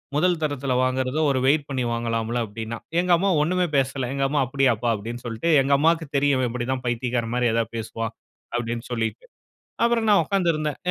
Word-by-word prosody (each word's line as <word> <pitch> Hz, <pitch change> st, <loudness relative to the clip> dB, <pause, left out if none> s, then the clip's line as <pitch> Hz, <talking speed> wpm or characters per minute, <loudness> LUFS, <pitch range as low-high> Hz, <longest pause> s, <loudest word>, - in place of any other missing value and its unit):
முதல் 175 Hz, +2 st, +2 dB
தரத்தில 140 Hz, -3 st, -1 dB
வாங்குறத, 130 Hz, +2 st, 0 dB
ஒரு 130 Hz, -, +1 dB
வெயிட் 145 Hz, +1 st, +3 dB
பண்ணி 130 Hz, -2 st, -1 dB
வாங்கலாம்ல்ல." 115 Hz, 0 st, -1 dB
அப்பிடீன்னான். 110 Hz, +2 st, -7 dB, 0.2 s
எங்க 180 Hz, 0 st, +1 dB
அம்மா 195 Hz, +3 st, +1 dB
ஒண்ணுமே 180 Hz, +3 st, +1 dB
பேசல. 135 Hz, -1 st, 0 dB
எங்க 135 Hz, 0 st, -1 dB
அம்மா 145 Hz, 0 st, +1 dB
"அப்படியாப்பா?" 125 Hz, -3 st, +1 dB
அப்பிடீன்னு 115 Hz, +3 st, -6 dB
சொல்லிட்டு, 115 Hz, +8 st, -2 dB
எங்க 135 Hz, +1 st, +1 dB
அம்மாவுக்கு 160 Hz, +2 st, +2 dB
தெரியும், 140 Hz, 0 st, +3 dB
"இவன் 125 Hz, -2 st, +1 dB
இப்பிடிதான் 125 Hz, +2 st, -3 dB
பைத்தியக்காரன் 120 Hz, -1 st, -1 dB
மாரி 125 Hz, -1 st, +2 dB
ஏதாவது 115 Hz, 0 st, -1 dB
பேசுவான்." 115 Hz, 0 st, -4 dB, 0.4 s
அப்பிடீன்னு 120 Hz, 0 st, -3 dB
சொல்லிட்டு. 115 Hz, -, -2 dB, 0.6 s
அப்புறம் 235 Hz, -1 st, +2 dB
நான் 205 Hz, -, +6 dB
உட்கார்ந்து 195 Hz, -4 st, +1 dB
இருந்தேன். 155 Hz, -1 st, -2 dB
130 Hz, 175 wpm, -24 LUFS, 115-150 Hz, 0.6 s, நான்